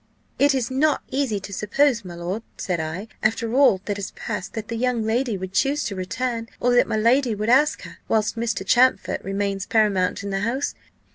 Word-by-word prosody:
"'It 285 0 +4
is 255 -1 -1
not 290 +3 +2
easy 260 -7 0
to 200 +1 -9
suppose, 230 +4 +1
my 175 -2 -8
lord,' 175 +5 -4 0.2
said 180 -3 -2
I, 160 +7 -4
'after 225 +1 0
all 260 -8 +5
that 205 -1 -2
has 200 - -4
passed, 205 -5 -5
that 220 -2 -5
the 230 - -4
young 240 -1 0
lady 230 0 0
would 190 0 -7
choose 285 +8 +1
to 200 - -3
return, 230 +5 -3
or 245 0 +2
that 245 - +4
my 220 - -1
lady 235 +2 +3
would 210 +2 -2
ask 295 +5 +3
her, - - -11
whilst 215 0 +1
Mr. 225 -4 -2
Champfort 255 +5 +3
remains 195 0 -2
paramount 200 -4 +1
in 200 - -4
the 195 - -1
house. 235 +7 -1
220 Hz, 205 wpm, -23 LUFS, 195-250 Hz, 0.2 s, all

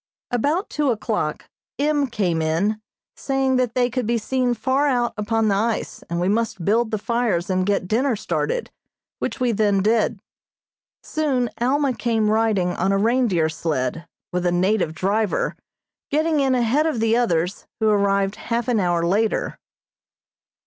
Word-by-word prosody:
About 290 - 0
two 295 -2 0
o'clock 225 -3 -2 0.3
M. 290 -1 +1
came 185 -9 -1
in, 185 +8 0 0.3
saying 270 -1 0
that 250 -2 0
they 250 -1 +3
could 250 -2 -2
be 235 0 +2
seen 250 +2 0
far 270 +4 +1
out 245 -3 +1
upon 225 +1 0
the 205 - +3
ice, 220 +3 -2
and 170 0 -2
we 175 - 0
must 210 -4 -1
build 225 +3 +2
the 220 - -1
fires 215 -5 -1
and 185 0 0
get 200 -3 0
dinner 245 +5 +1
started, 480 - -2 0.5
which - - -3
we 250 -2 +2
then 205 -3 +2
did. 220 0 +1 0.8
Soon 265 -6 -1
Alma 270 +2 +1
came 225 -2 0
riding 215 -5 +2
on 185 +2 0
a 195 - +2
reindeer 220 -6 +2
sled, 160 0 -2 0.3
with 180 0 0
a - - +2
native 180 -2 +1
driver, 200 +4 0 0.5
getting 310 +1 +1
in 265 -2 +2
ahead 250 +6 +2
of 305 -8 -1
the 225 0 +2
others, 180 -6 0
who 220 - +2
arrived 200 -1 +2
half 235 0 -2
an 240 -3 +2
hour 175 -3 +1
later. 210 +5 0
220 Hz, 160 wpm, -22 LUFS, 195-250 Hz, 0.8 s, they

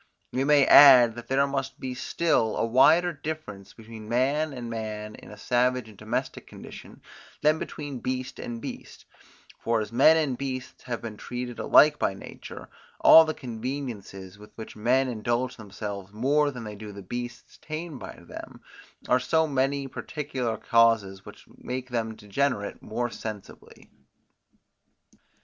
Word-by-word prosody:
We 130 - 0
may 145 -1 +5
add, 125 -5 +9
that 120 +1 -10
there 135 +1 +2
must 135 -1 -4
be 130 -1 -4
still 125 -3 0
a - - +1
wider 155 +9 +4
difference 140 -10 -7
between 110 -1 -11
man 140 +6 +1
and 125 -3 -7
man 110 -2 -5
in - - -13
a 105 - -11
savage 125 +2 0
and 110 - -14
domestic - - -4
condition, - - -12 0.4
than 155 +1 +3
between 145 -4 -6
beast 130 +2 -4
and 120 -1 -6
beast; - - -9 0.5
for 115 0 0
as 105 0 -4
men 140 +7 +6
and 140 -6 -1
beasts 130 -2 -5
have 120 -2 -4
been 110 -2 -7
treated 125 0 -6
alike 150 0 +5
by 95 - 0
nature, - - -10 0.3
all 160 - +9
the 155 - -3
conveniences 115 -6 -6
with 105 - -13
which 110 - -9
men 125 +5 +2
indulge 120 +2 -2
themselves 100 -2 -7
more 140 +7 +2
than 125 -4 -7
they 105 -1 -7
do 105 0 -9
the 100 -1 -10
beasts 120 +5 -7
tamed 155 -2 -6
by - - -9
them, - - -10 0.5
are 125 - +4
so 160 +6 +2
many 140 -1 -1
particular 130 -5 -4
causes 110 -4 +2
which - - -13
make 125 0 -6
them 110 -2 -2
degenerate 105 0 -2
more 120 +2 -3
sensibly. 110 -4 -9
125 Hz, 155 wpm, -26 LUFS, 110-140 Hz, 0.5 s, add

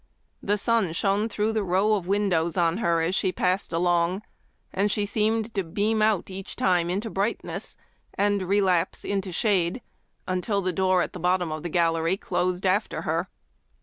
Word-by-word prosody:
The 205 +1 0
sun 215 -5 +1
shone 200 +5 +1
through 215 +1 -1
the 220 - +1
row 195 +4 +2
of 190 -4 -1
windows 190 -4 +1
on 170 0 +2
her 170 -7 +1
as 165 +3 0
she 190 -1 +1
passed 185 +1 0
along, 175 +3 +1 0.5
and 200 +2 +1
she 205 0 0
seemed 220 +2 0
to 195 -3 0
beam 210 +6 0
out 215 -3 +1
each 190 0 -7
time 175 -2 +2
into 200 +5 -2
brightness, 200 +4 -3 0.4
and 205 0 +1
relapse 185 -2 +1
into 195 -2 -2
shade, 190 +3 +1 0.4
until 195 +2 -1
the 185 0 -1
door 185 0 +2
at - - -6
the 180 - -7
bottom 180 -1 +1
of 155 0 -4
the 175 - -4
gallery 165 +1 +1
closed 180 -1 -1
after 190 +3 0
her. - - -1
190 Hz, 175 wpm, -25 LUFS, 175-205 Hz, 0.5 s, row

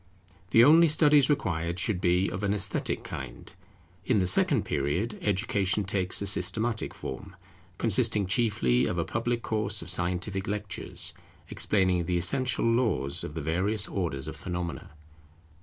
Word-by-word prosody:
The 115 - +6
only 165 +5 +6
studies 150 -2 +4
required 90 - -1
should 95 -1 -1
be 90 +2 +2
of 95 - -5
an 100 0 0
esthetic 100 -1 -2
kind. - - -8 0.5
In 125 - +1
the 95 - +2
second 145 - +2
period, 85 +11 -2
Education 100 0 0
takes 95 0 0
a - - -3
systematic 105 +4 0
form, 95 +9 -8 0.4
consisting 110 -2 +1
chiefly 95 - +1
of - - -3
a - - -1
public 120 -1 -2
course 105 -3 0
of 90 - -1
scientific 90 +3 +1
lectures, 105 0 -2 0.4
explaining 90 -3 +1
the 90 +1 -1
essential 125 +9 +1
laws 115 - 0
of 75 - -7
the 80 - -4
various 95 +7 -1
orders 80 -8 -3
of 80 - -6
phenomena. 90 -2 -5
100 Hz, 145 wpm, -27 LUFS, 90-115 Hz, 0.5 s, The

